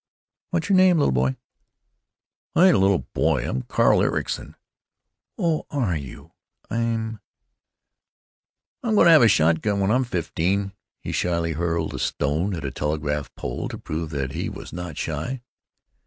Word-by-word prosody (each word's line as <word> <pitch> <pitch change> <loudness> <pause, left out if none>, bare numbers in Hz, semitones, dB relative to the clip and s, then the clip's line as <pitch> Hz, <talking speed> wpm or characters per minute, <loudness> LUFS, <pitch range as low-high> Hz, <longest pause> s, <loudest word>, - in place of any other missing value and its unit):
"What's 170 -3 -1
your 195 -2 +4
name, 185 -2 +6
little 145 - +3
boy?" 65 +1 +1 1.2
"Ain't 185 +2 +6
a - - +3
little 95 -2 +2
boy. 75 -6 +1
I'm 65 - -2
Carl - - +3
Ericson." - - -2 0.8
"Oh, 165 -3 0
are 120 - 0
you? 70 -4 -8 0.4
I'm——" 115 -1 -1 1.6
"I'm 225 -3 0
gonna 170 -4 +7
have 160 - +8
a 115 - +7
shotgun 95 +2 +2
when 100 +1 +2
I'm 130 +3 +3
fifteen." 95 -1 -1 0.3
He - - -5
shyly 85 -2 0
hurled 85 0 -1
a - - -5
stone 80 +8 -1
at 80 -4 -6
a 65 - -3
telegraph 75 0 -2
pole - - -4
to - - -6
prove 80 +1 -4
that 70 -3 -3
he - - -3
was - - -9
not 90 -4 -6
shy. 125 -1 -4
90 Hz, 150 wpm, -24 LUFS, 75-115 Hz, 1.6 s, have